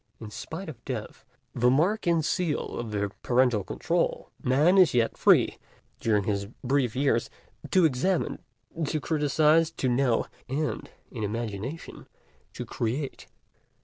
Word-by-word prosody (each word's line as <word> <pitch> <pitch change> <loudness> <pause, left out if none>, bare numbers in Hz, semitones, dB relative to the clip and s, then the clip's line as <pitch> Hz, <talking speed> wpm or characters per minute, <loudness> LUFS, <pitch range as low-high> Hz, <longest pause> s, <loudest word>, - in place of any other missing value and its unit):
In 110 -2 -8
spite 135 - -7
of 125 -7 -9
Death, 125 -5 -6 0.3
the 125 +1 +3
mark 175 - +2
and 165 -3 +2
seal 175 -5 -1
of 120 -2 -4
the 100 -1 -2
parental 125 -4 +2
control, 90 - -1
Man 150 +9 +4
is 170 -9 +5
yet 115 -2 +2
free, - - +4 0.4
during 105 -3 +1
his 100 0 -1 0.2
brief 130 -3 +1
years, 130 -4 +1 0.4
to 185 -3 +4
examine, 160 +6 0 0.5
to 155 - -1
criticize, 155 +1 +3
to 160 -5 -3
know, 125 -1 +2 0.2
and 150 +3 -2 0.2
in 115 - -6
imagination 115 +7 -5 0.5
to - - -6
create. 130 +5 -3
130 Hz, 135 wpm, -27 LUFS, 115-155 Hz, 0.5 s, is